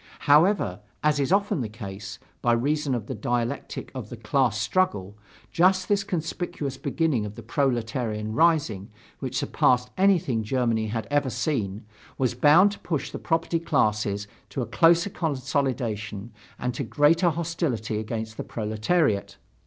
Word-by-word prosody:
However, 150 - +4 0.2
as 150 -1 +3
is 140 +3 0
often 200 -6 +2
the 110 - -3
case, 100 -2 -8 0.2
by 120 - +3
reason 140 +3 0
of 115 -4 -4
the 130 - -5
dialectic 120 +4 -3
of 125 -6 -6
the 120 - -8
class 115 0 +1
struggle, 105 - 0 0.4
just 185 +2 +3
this 200 -1 +2
conspicuous 170 -6 -3
beginning 140 -3 0
of 105 0 -6
the 115 - -9
proletarian 115 -4 -1
rising, 150 - +2 0.3
which - - -3
surpassed 125 0 +2
anything 170 - +3
Germany 115 -1 0
had 110 +1 -3
ever 145 -2 +2
seen, 110 - -2 0.3
was 130 -2 +1
bound 155 +10 +6
to 205 - -9
push 160 -5 -3
the - - -6
property 165 +1 0
classes 105 -9 0 0.2
to 130 - -3
a - - -3
closer 170 - +4
consolidation 130 - -2 0.2
and 125 0 -2
to 140 - -3
greater 160 +7 +3
hostility 155 -10 -2
against 110 0 -5
the - - -3
proletariat. 110 - 0
130 Hz, 145 wpm, -25 LUFS, 110-160 Hz, 0.4 s, bound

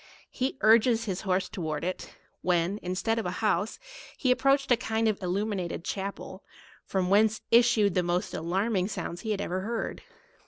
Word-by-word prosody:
He 265 +1 -2
urg 220 +2 +6
es 230 -2 +2
his 190 -3 -3
horse 185 -1 0
towards 160 -3 -4
it; 185 - -5 0.3
when, 180 +3 +1
instead 190 +5 -1
of 220 - -3
an 180 - -3
house, 210 +1 0 0.4
he 255 - +2
approached 275 +1 +2
a - - +8
kind 225 -1 -1
of 215 -2 0
illuminated 185 -2 -2
chapel, 195 -1 -5 0.4
from 185 -1 -1
whence 215 +2 +4
issued 230 -4 +5
the 180 - +2
most 180 +2 -1
alarming 185 +4 0
172 - - -2
sounds 175 -1 -5
he 220 - -5
had 205 -2 0
ever 185 -1 -2
heard. 225 +3 -3
200 Hz, 180 wpm, -28 LUFS, 180-225 Hz, 0.4 s, a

